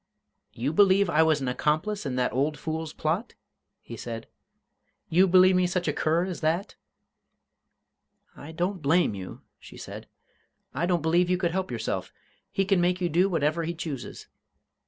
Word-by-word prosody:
"You 130 +6 -2
believe 195 0 +4
I 155 - +4
was 160 -2 +3
an 135 - -2
accomplice 155 +9 -1
in 130 - -3
that 125 -1 0
old 145 +4 0
fool's 160 +1 -4
plot?" 170 +10 -2 0.5
he - - -8
said. - - -6 0.8
"You 180 +4 +4
believe 185 +1 +6
me 180 0 +3
such 175 -1 -2
a 150 - +1
cur 165 +4 +1
as 185 -2 -6
that?" 165 +5 0 1.6
"I 150 - -10
don't 180 +3 -2
blame 160 -3 +2
you," 95 -2 -8 0.2
she - - -13
said. - - -9 0.7
"I 175 - -1
don't 175 -3 +1
believe 175 +2 +2
you 180 - +2
could 175 -2 0
help 190 +1 -2
yourself. 115 -3 -3 0.4
He 195 - 0
can 195 -2 +2
make 180 +1 +1
you 175 -2 0
do 180 +5 +3
whatever 165 -1 0
he 170 +1 -3
chooses. 155 -6 -6
170 Hz, 170 wpm, -27 LUFS, 150-180 Hz, 1.6 s, believe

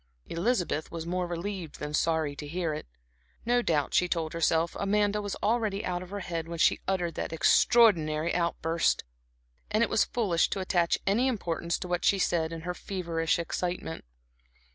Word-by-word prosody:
Elizabeth 175 -4 -1
was 165 -1 -6
more 180 +1 -1
relieved 175 -1 -5
than 150 0 -5
sorry 160 -2 +1
to 145 +1 -7
hear 165 0 -2
it. 150 - -6 0.6
No 245 +1 +3
doubt, 155 -9 0
she 180 - +3
told 165 -3 -2
herself, 165 0 +1
Amanda 205 +1 +1
was 205 -1 -4
already 215 -2 0
out 180 -1 -2
of 180 - -9
her 200 +1 -5
head 165 -2 -4
when 170 0 -5
she - - +3
uttered 180 -3 0
that - - -4
extraordinary 165 -3 +4
outburst, 170 -1 +1 0.7
and 215 +2 +2
it - - 0
was - - +4
foolish 190 -8 +1
to 195 - -2
attach 175 -2 +1
any 225 +7 +2
importance 170 -8 -1
to 180 - -6
what 175 0 -1
she 200 - +4
said 165 -3 +1
in 165 -1 -6
her 180 +2 -3
feverish 170 -4 -1
excitement. 175 0 -3
175 Hz, 175 wpm, -29 LUFS, 165-200 Hz, 0.7 s, extraordinary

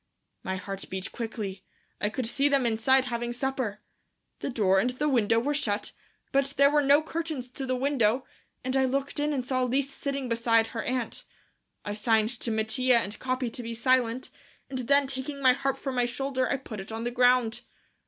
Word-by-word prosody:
My 190 - -3
heart 195 +1 -6
beat 190 +2 -4
quickly. 215 -5 -5 0.4
I 205 - +1
could 250 +3 -3
see 275 +5 +1
them 275 -3 +3
inside 255 +4 +3
having 240 -1 -2
supper. 245 -4 -2 0.6
The - - -3
door 195 -6 +3
and 245 - +2
the 255 +4 -1
window 230 -5 +3
were 285 +5 0
shut, 210 -8 -1 0.4
but 275 0 +1
there 280 +1 +6
were 295 0 +4
no 285 +2 +5
curtains 315 -5 -4
to 265 +1 -6
the 255 - +1
window, 255 -2 +1 0.4
and 260 +1 -1
I 265 0 +4
looked 275 +2 -1
in 295 +1 +1
and 260 -4 -1
saw 255 0 0
Lise 265 +2 0
sitting 275 -2 -3
beside 230 -1 +3
her 225 - -4
aunt. 250 -1 -3 0.6
I 205 - -2
signed 220 0 +2
to - - -2
Mattia 225 +3 +2
and 210 -2 -3
Capi 255 -2 -1
to 245 - -6
be 230 0 -5
silent, 250 0 +1 0.4
and 260 - -2
then 280 +3 +3
taking 270 +1 -5
my 260 -2 +6
harp 270 +1 -1
from 270 - -4
my 245 -1 +2
shoulder, 260 +1 -1
I 275 - +1
put 230 -5 -8
it 195 +3 -7
on 225 +1 -4
the 240 - -2
ground. 245 -2 +3
250 Hz, 200 wpm, -28 LUFS, 225-270 Hz, 0.6 s, there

